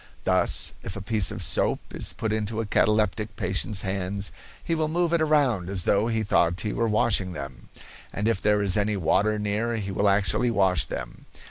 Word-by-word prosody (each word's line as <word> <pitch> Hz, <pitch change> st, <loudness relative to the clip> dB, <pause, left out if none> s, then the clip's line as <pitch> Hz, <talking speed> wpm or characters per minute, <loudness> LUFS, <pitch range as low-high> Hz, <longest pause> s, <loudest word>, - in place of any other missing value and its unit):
Thus, -, -, +3 dB
if 95 Hz, -, -7 dB
a 100 Hz, -, -6 dB
piece 105 Hz, -2 st, +2 dB
of -, -, -1 dB
soap -, -, 0 dB
is -, -, +2 dB
put 110 Hz, -1 st, -3 dB
into 110 Hz, 0 st, -3 dB
a 115 Hz, -, -2 dB
cataleptic 105 Hz, 0 st, 0 dB
patient's 95 Hz, +2 st, -1 dB
hands; 95 Hz, 0 st, -3 dB, 0.3 s
he 165 Hz, -, -2 dB
will 160 Hz, -1 st, 0 dB
move 170 Hz, +1 st, 0 dB
it 170 Hz, -, +2 dB
around 140 Hz, -, +1 dB
as 95 Hz, -3 st, 0 dB
though 100 Hz, +5 st, +1 dB
he 110 Hz, -1 st, -1 dB
thought 85 Hz, -3 st, +1 dB
he 105 Hz, -, -3 dB
were 115 Hz, -, 0 dB
washing 105 Hz, -3 st, +1 dB
them, 70 Hz, -5 st, -9 dB, 0.4 s
and 105 Hz, +2 st, -2 dB
if 115 Hz, -4 st, 0 dB
there 105 Hz, -1 st, +2 dB
is 95 Hz, -2 st, +1 dB
any 105 Hz, 0 st, 0 dB
water 100 Hz, +4 st, +1 dB
near 105 Hz, +3 st, -1 dB
he 100 Hz, -3 st, -4 dB
will 100 Hz, +1 st, +1 dB
actually 100 Hz, +5 st, +1 dB
wash 95 Hz, -6 st, +2 dB
them. -, -, -8 dB
105 Hz, 200 wpm, -25 LUFS, 95-110 Hz, 0.4 s, Thus